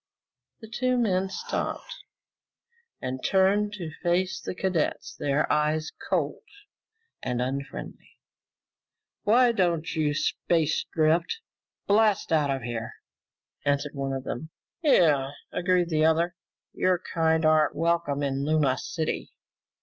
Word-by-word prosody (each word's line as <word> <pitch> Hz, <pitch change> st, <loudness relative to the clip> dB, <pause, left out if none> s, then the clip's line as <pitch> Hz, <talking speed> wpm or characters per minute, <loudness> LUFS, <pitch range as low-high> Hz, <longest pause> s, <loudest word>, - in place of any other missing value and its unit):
The 220 Hz, -, -9 dB
two 250 Hz, +2 st, 0 dB
men 195 Hz, -5 st, +1 dB
stopped -, -, -4 dB, 1.1 s
and 130 Hz, 0 st, -4 dB
turned 200 Hz, +2 st, +3 dB
to 175 Hz, -6 st, -6 dB
face 185 Hz, +2 st, 0 dB
the -, -, -5 dB
cadet, 185 Hz, -4 st, 0 dB, 0.2 s
their 145 Hz, +1 st, +1 dB
eyes 155 Hz, +1 st, +1 dB, 0.2 s
cold -, -, 0 dB, 0.8 s
and 125 Hz, -1 st, -2 dB
unfriendly. 130 Hz, -, -5 dB, 1.1 s
"Why 240 Hz, +3 st, +5 dB
don't 170 Hz, -7 st, 0 dB
you 150 Hz, -2 st, +1 dB
space 160 Hz, 0 st, +1 dB
drift 165 Hz, -, +2 dB, 0.5 s
blast 210 Hz, -4 st, +3 dB
out 150 Hz, -3 st, +3 dB
of 135 Hz, -3 st, -1 dB
here?" 115 Hz, -1 st, -4 dB, 0.7 s
asked 145 Hz, 0 st, +1 dB
one 135 Hz, -1 st, -3 dB
of 135 Hz, -1 st, -3 dB
them. 155 Hz, +5 st, -5 dB, 0.3 s
"Yeah," 150 Hz, -, +4 dB, 0.2 s
agreed 180 Hz, -1 st, +1 dB
the 155 Hz, -2 st, +2 dB
other, 165 Hz, +2 st, +2 dB, 0.4 s
"your 185 Hz, -1 st, +2 dB
kind 160 Hz, -1 st, +2 dB
aren't 155 Hz, -1 st, +4 dB
welcome 165 Hz, -3 st, 0 dB
in 135 Hz, 0 st, -1 dB
Luna 150 Hz, -3 st, +2 dB
City." 160 Hz, -2 st, -3 dB
160 Hz, 120 wpm, -27 LUFS, 145-185 Hz, 1.1 s, Why